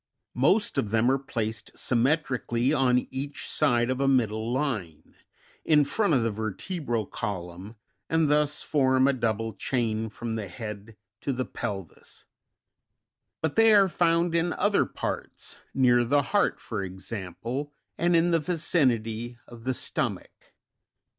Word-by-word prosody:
Most 200 Hz, -, +2 dB
of 105 Hz, -, -1 dB
them 115 Hz, +4 st, +3 dB
are 135 Hz, -, +1 dB
placed 110 Hz, -4 st, -4 dB
symmetrically 125 Hz, -1 st, +1 dB
on 125 Hz, -3 st, +2 dB
each 140 Hz, +2 st, -5 dB
side 120 Hz, -5 st, +2 dB
of 130 Hz, +1 st, -2 dB
a 135 Hz, -, +2 dB
middle 115 Hz, -4 st, +1 dB
line, 115 Hz, -, -3 dB, 0.5 s
in 150 Hz, -2 st, +5 dB
front 165 Hz, +4 st, +1 dB
of 125 Hz, -, +2 dB
the 115 Hz, -, 0 dB
vertebral 110 Hz, -, -3 dB
column, 95 Hz, 0 st, -6 dB, 0.3 s
and 160 Hz, -1 st, +3 dB
thus 150 Hz, 0 st, +1 dB
form 130 Hz, -2 st, +3 dB
a 140 Hz, -, +3 dB
double 115 Hz, -3 st, -1 dB
chain 110 Hz, -3 st, -1 dB
from 115 Hz, +1 st, -5 dB
the 105 Hz, -3 st, -4 dB
head 105 Hz, +3 st, -8 dB, 0.2 s
to 140 Hz, -, -1 dB
the 130 Hz, -1 st, -2 dB
pelvis; 95 Hz, -5 st, -7 dB, 1.2 s
but 160 Hz, -2 st, 0 dB
they 225 Hz, -1 st, +6 dB
are 200 Hz, -1 st, +6 dB
found 170 Hz, -1 st, +2 dB
in 170 Hz, +1 st, +1 dB
other 205 Hz, 0 st, +2 dB
parts: -, -, -5 dB
near 125 Hz, -2 st, +4 dB
the 140 Hz, +4 st, +2 dB
heart, 205 Hz, +7 st, +1 dB
for 110 Hz, -4 st, -4 dB
example, 100 Hz, -, -5 dB, 0.2 s
and 175 Hz, +1 st, +2 dB
in 170 Hz, +1 st, +3 dB
the 165 Hz, -, +3 dB
vicinity 120 Hz, -9 st, 0 dB
of 120 Hz, -1 st, -13 dB
the 130 Hz, -, +1 dB
stomach. -, -, -3 dB
125 Hz, 140 wpm, -27 LUFS, 110-150 Hz, 1.2 s, they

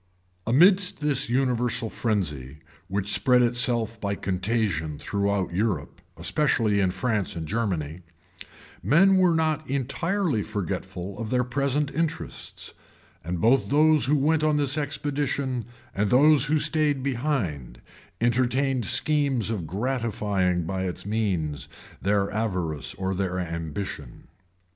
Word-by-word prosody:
[*] 90 Hz, +1 st, -38 dB
Amidst 180 Hz, -, +4 dB
this 150 Hz, -5 st, 0 dB
universal 125 Hz, -2 st, 0 dB
frenzy, 75 Hz, -, -2 dB, 0.3 s
which 100 Hz, +1 st, -1 dB
spread 125 Hz, -1 st, +4 dB
itself 120 Hz, -2 st, 0 dB
by 100 Hz, -1 st, -1 dB
contagion 95 Hz, -6 st, -1 dB
throughout 100 Hz, -2 st, -1 dB
Europe, 95 Hz, -6 st, -2 dB, 0.2 s
especially 105 Hz, -, +1 dB
in 95 Hz, -2 st, +2 dB
France 105 Hz, +1 st, -1 dB
and 80 Hz, -2 st, -5 dB
Germany, 90 Hz, -7 st, -2 dB, 0.8 s
men 190 Hz, +6 st, +5 dB
were 180 Hz, -3 st, +4 dB
not 155 Hz, -2 st, 0 dB
entirely 155 Hz, -, -1 dB
forgetful 100 Hz, -2 st, -5 dB
of 115 Hz, -2 st, -4 dB
their 125 Hz, +1 st, +2 dB
present 140 Hz, +3 st, -1 dB
interests; 165 Hz, +2 st, -4 dB, 0.5 s
and 85 Hz, 0 st, -3 dB
both 120 Hz, +8 st, +3 dB
those 155 Hz, -1 st, +4 dB
who 150 Hz, -, +3 dB
went 155 Hz, +3 st, +2 dB
on 155 Hz, -1 st, +3 dB
this 140 Hz, -1 st, 0 dB
expedition, 140 Hz, -3 st, -2 dB, 0.3 s
and 100 Hz, +1 st, 0 dB
those 150 Hz, +3 st, +5 dB
who 155 Hz, +2 st, +2 dB
stain 150 Hz, -3 st, +1 dB
behind, 115 Hz, -, -2 dB, 0.4 s
entertained 125 Hz, +1 st, +1 dB
schemes 140 Hz, -4 st, +1 dB
of 95 Hz, -8 st, -3 dB
gratifying 105 Hz, -5 st, -1 dB
by 95 Hz, +3 st, -3 dB
its 90 Hz, 0 st, -5 dB
means 95 Hz, -10 st, -2 dB, 0.3 s
their 100 Hz, 0 st, +1 dB
avarice 90 Hz, -9 st, -2 dB
or 95 Hz, 0 st, -2 dB
their 95 Hz, -1 st, -2 dB
ambition. 80 Hz, -4 st, -5 dB
115 Hz, 125 wpm, -25 LUFS, 95-140 Hz, 0.8 s, men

